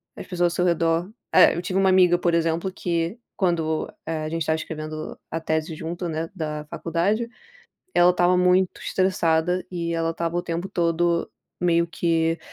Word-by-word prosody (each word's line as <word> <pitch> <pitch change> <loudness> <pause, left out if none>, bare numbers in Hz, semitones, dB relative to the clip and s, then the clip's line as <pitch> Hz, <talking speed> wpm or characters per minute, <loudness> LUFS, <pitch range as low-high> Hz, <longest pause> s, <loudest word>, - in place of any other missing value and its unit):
as - - -9
pessoas 175 -2 +1
ao - - -6
seu 180 - +1
redor, 170 +1 +1 0.2
eh, - - +7
eu 170 - -2
tive 185 +2 -1
uma 190 -1 +4
amiga 180 -2 +5
por 175 -1 +1
exemplo, 165 +3 0
que 170 +3 -2 0.2
quando, 165 -4 0
eh, 160 -1 -3
a - - -3
gente 165 +1 -3
estava 160 +1 +1
escrevendo 155 -1 -6
a 165 - -2
tese 160 0 -1
junto, 170 +3 -4
né, 160 0 -3
da 150 -3 -4
faculdade, 195 +8 -1 0.7
ela 175 +1 +6
estava 180 0 +3
muito 180 0 +3
estressada, 180 -1 +1
e 170 -1 -3
ela 165 0 0
estava 165 0 -3
o 175 - 0
tempo 170 +2 -3
todo 170 -2 +1 0.3
meio 170 -1 +3
que, 165 -1 0
170 Hz, 175 wpm, -24 LUFS, 165-180 Hz, 0.7 s, eh